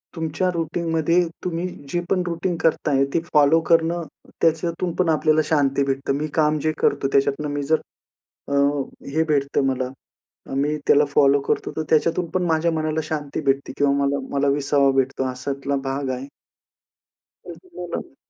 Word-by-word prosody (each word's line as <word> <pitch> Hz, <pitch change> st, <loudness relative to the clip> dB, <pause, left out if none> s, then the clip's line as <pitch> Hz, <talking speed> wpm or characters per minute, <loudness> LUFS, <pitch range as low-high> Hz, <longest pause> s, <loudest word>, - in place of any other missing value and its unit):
तुमच्या 165 Hz, +3 st, -1 dB
रुटीनमध्ये 165 Hz, 0 st, 0 dB, 0.3 s
तुम्ही 175 Hz, 0 st, -2 dB, 0.2 s
जे 175 Hz, -, 0 dB
पण 185 Hz, -, +2 dB
रुटीन 170 Hz, +1 st, -2 dB
करताय 145 Hz, -4 st, +2 dB
ते -, -, +3 dB
फॉलो 150 Hz, +1 st, +5 dB
करणं, 170 Hz, +1 st, +3 dB, 0.4 s
त्याच्यातून 165 Hz, +2 st, 0 dB
पण 175 Hz, -, +3 dB
आपल्याला 155 Hz, 0 st, +3 dB
शांती 140 Hz, -3 st, +2 dB
भेटते. 135 Hz, 0 st, -1 dB
मी 150 Hz, +2 st, -2 dB
काम 155 Hz, -1 st, +3 dB
जे 155 Hz, -, +2 dB
करतो 140 Hz, -1 st, +1 dB
त्याच्यातनं 140 Hz, +2 st, +1 dB
मी 145 Hz, 0 st, -2 dB
जर 155 Hz, +3 st, +1 dB, 0.7 s
अ, 140 Hz, -, -3 dB, 0.6 s
हे 160 Hz, +2 st, +2 dB
भेटतं 140 Hz, -1 st, +1 dB
मला, 130 Hz, -1 st, -1 dB, 0.6 s
अ, -, -, -7 dB
मी 145 Hz, +2 st, +1 dB
त्याला 145 Hz, +1 st, +5 dB
फॉलो 140 Hz, 0 st, +5 dB
करतो, -, -, -1 dB
तर -, -, 0 dB
त्याच्यातून 165 Hz, +3 st, +2 dB
पण 185 Hz, -, 0 dB
माझ्या 165 Hz, +1 st, +2 dB
मनाला 155 Hz, 0 st, -1 dB
शांती 150 Hz, -1 st, -4 dB
भेटते 135 Hz, 0 st, +1 dB
किंवा 140 Hz, -1 st, +3 dB
मला 140 Hz, 0 st, 0 dB, 0.2 s
मला 140 Hz, 0 st, +2 dB
विसावा 140 Hz, -1 st, +2 dB
भेटतो 135 Hz, 0 st, +1 dB
अशातला 135 Hz, +2 st, -3 dB
भाग 135 Hz, 0 st, -2 dB
आहे. 130 Hz, +2 st, -5 dB, 1.2 s
तसं 370 Hz, -, -11 dB
मलाही 175 Hz, -5 st, -6 dB
150 Hz, 155 wpm, -22 LUFS, 140-165 Hz, 1.2 s, फॉलो